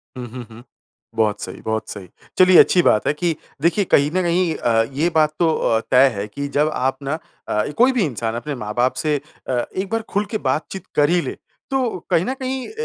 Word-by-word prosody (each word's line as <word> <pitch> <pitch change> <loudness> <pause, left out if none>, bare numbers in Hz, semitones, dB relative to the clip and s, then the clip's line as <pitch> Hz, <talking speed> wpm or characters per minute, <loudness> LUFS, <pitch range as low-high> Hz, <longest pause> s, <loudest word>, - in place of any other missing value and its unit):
हुँ, 125 -1 -6
हुँ, 125 0 -7
हुँ। 115 +2 -12 0.5
बहुत 110 -2 +1
सही, - - -7
बहुत 110 0 -3
सही। 100 -3 -8 0.3
चलिए, 185 -1 +7
अच्छी 180 - +6
बात 105 - +3
है - - +3
कि 165 +2 -1 0.3
देखिए, 170 +5 +2
कहीं 145 -4 +3
न 185 - +3
कहीं 170 -1 +1
अ, 115 -2 +2
ये 155 +6 +1
बात 155 -1 +3
तो 165 -2 +3
अ, 110 - +1
तय 130 +2 +7
है 100 +1 -4
कि 140 +7 -5
जब 150 +1 +3
आप 130 +1 -1
ना 140 +2 -2 0.3
अ, 105 - 0
कोई 250 +3 +5
भी 250 -5 +1
इंसान 115 -5 -3
अपने 145 +5 -4
माँ-बाप 120 +2 -1
से 155 -1 +1 0.3
अ, 130 - 0 0.2
एक 190 +1 -2
बार 225 0 0
खुल 205 +1 0
के 220 - 0
बातचीत 155 +7 -3
कर 145 0 +4
ही 175 0 +3
ले, - - -5 0.3
तो 255 -8 0
कहीं 170 - +2
न 255 - -1
कहीं 265 -1 -4
अ, - - -10
150 Hz, 225 wpm, -20 LUFS, 120-185 Hz, 0.5 s, चलिए